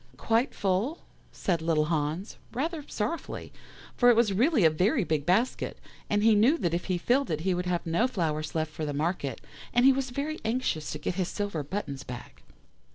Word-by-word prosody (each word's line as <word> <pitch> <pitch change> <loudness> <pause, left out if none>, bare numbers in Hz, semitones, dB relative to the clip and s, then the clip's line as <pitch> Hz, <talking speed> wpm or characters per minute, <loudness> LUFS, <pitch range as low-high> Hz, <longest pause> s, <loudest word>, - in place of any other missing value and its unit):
"'Quite 230 - +1
full?' 205 - 0 0.3
said 170 -4 -1
little 160 -2 +2
Hans, 155 +5 -2 0.2
rather 310 +4 -2
sorrowfully, 230 +10 -4 0.4
for 245 - +5
it 240 - +6
was 225 -3 +3
really 240 - +3
a - - +8
very 190 +8 +2
big 155 -4 -1
basket, 225 +8 +1 0.3
and 205 0 +2
he 225 0 +6
knew 230 +10 +5
that 170 - -1
if 175 - -1
he 185 -2 0
filled 255 +10 +1
it 155 -1 -1
he 190 +2 +1
would 180 0 -2
have 175 -1 -1
no 170 +9 +2
flowers 155 -9 -2
left 155 -1 -1
for 155 - -6
the 145 -1 -2
market 145 -3 -2 0.3
and 245 +1 +4
he 270 - +8
was 265 0 -2
very 285 +5 -3
anxious 220 -10 -1
to - - -4
get 150 - -2
his 180 - 0
silver 200 -7 -3
buttons 140 -3 -4
back. 125 -1 -9
185 Hz, 200 wpm, -28 LUFS, 160-240 Hz, 0.4 s, a